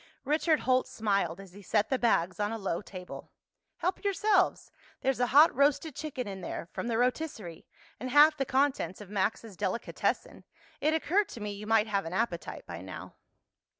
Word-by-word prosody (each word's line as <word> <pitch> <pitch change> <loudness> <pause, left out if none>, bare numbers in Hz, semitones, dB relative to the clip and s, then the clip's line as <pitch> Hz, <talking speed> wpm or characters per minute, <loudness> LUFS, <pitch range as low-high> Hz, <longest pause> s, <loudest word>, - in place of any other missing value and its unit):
Richard 310 +2 +2
Holt 255 0 +2
smiled 200 -5 -1
as 195 -2 -12
he 205 - -12
set 210 +2 +1
the 265 - +1
bags 185 -5 +1
on 205 +1 0
a 225 - -3
low 195 -4 -2
table. 185 -3 -9 0.5
"Help 365 +4 -2
yourselves. 400 -1 +2 0.3
There's 270 -2 0
a 245 - +2
hot 295 +6 +6
roasted 285 +3 +2
chicken 280 -6 -4
in 195 -1 -6
there, - - -5
from - - -4
the 230 -2 0
rotisserie, 245 - -2 0.3
and 255 - -4
half 295 +3 +7
the 275 - 0
contents 265 -7 0
of 205 -2 -11
Max's 210 +1 -1
delicatessen. 190 +6 -2 0.4
It 310 +2 +2
occurred 380 +6 +1
to 235 - -8
me 210 -1 -4
you 205 +1 -8
might 220 -1 +4
have 200 -4 -1
an 165 - -5
appetite 190 -4 -2
by 85 0 -7
now." 95 0 -9
230 Hz, 185 wpm, -30 LUFS, 200-290 Hz, 0.5 s, half